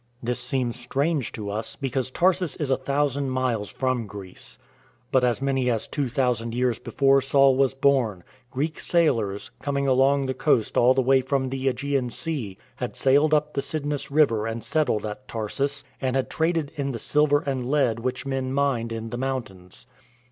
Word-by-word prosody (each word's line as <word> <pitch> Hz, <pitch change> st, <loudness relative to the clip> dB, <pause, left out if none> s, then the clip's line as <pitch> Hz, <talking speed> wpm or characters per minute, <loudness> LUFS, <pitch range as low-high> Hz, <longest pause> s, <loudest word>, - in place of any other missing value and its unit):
This 120 Hz, +1 st, 0 dB
seems 125 Hz, -2 st, 0 dB
strange 140 Hz, +2 st, -1 dB
to 105 Hz, -3 st, -5 dB
us, 110 Hz, +2 st, -4 dB
because 130 Hz, -2 st, -2 dB
Tarsus 180 Hz, +2 st, +1 dB
is 145 Hz, -4 st, -2 dB
a -, -, +5 dB
thousand 140 Hz, 0 st, 0 dB
miles 125 Hz, -5 st, -1 dB
from 130 Hz, -4 st, -1 dB
Greece. 100 Hz, -2 st, -7 dB, 0.5 s
But 130 Hz, -1 st, +3 dB
as 125 Hz, +1 st, +1 dB
many 135 Hz, -2 st, +1 dB
as 115 Hz, -3 st, -1 dB
two 140 Hz, -4 st, -2 dB
thousand 120 Hz, -2 st, 0 dB
years 125 Hz, -2 st, +1 dB
before 135 Hz, +2 st, +3 dB
Saul 135 Hz, 0 st, +4 dB
was 135 Hz, 0 st, +2 dB
born, 130 Hz, -9 st, +2 dB, 0.3 s
Greek 145 Hz, +5 st, -3 dB
sailors, 115 Hz, -, +1 dB
coming 140 Hz, 0 st, -1 dB
along 135 Hz, +1 st, +3 dB
the 130 Hz, -, -1 dB
coast 130 Hz, -4 st, +1 dB
all 125 Hz, +2 st, +5 dB
the 130 Hz, -, +2 dB
way 135 Hz, +1 st, +4 dB
from 130 Hz, 0 st, -1 dB
the 135 Hz, 0 st, -3 dB
yEgean 135 Hz, -1 st, 0 dB
Sea, 130 Hz, -, -3 dB, 0.2 s
had -, -, -4 dB
sailed 145 Hz, +3 st, +4 dB
up 150 Hz, 0 st, 0 dB
the 140 Hz, -, 0 dB
Cydnus 145 Hz, -1 st, -3 dB
River 135 Hz, -7 st, +3 dB
and 115 Hz, 0 st, -4 dB
settled 145 Hz, -9 st, 0 dB
at 105 Hz, +5 st, -7 dB
Tarsus, 135 Hz, +6 st, -2 dB, 0.2 s
and 130 Hz, -1 st, 0 dB
had 135 Hz, -, -1 dB
traded 160 Hz, -2 st, 0 dB
in 140 Hz, -2 st, -2 dB
the -, -, -3 dB
silver 145 Hz, +4 st, +2 dB
and 130 Hz, -3 st, -3 dB
lead 135 Hz, -6 st, +2 dB
which 125 Hz, +3 st, -3 dB
men 135 Hz, -1 st, -2 dB
mined 135 Hz, -4 st, 0 dB
in 115 Hz, 0 st, -5 dB
the 120 Hz, -, -3 dB
moun 130 Hz, -1 st, -1 dB
tains. 90 Hz, -3 st, -13 dB
130 Hz, 185 wpm, -25 LUFS, 120-140 Hz, 0.5 s, a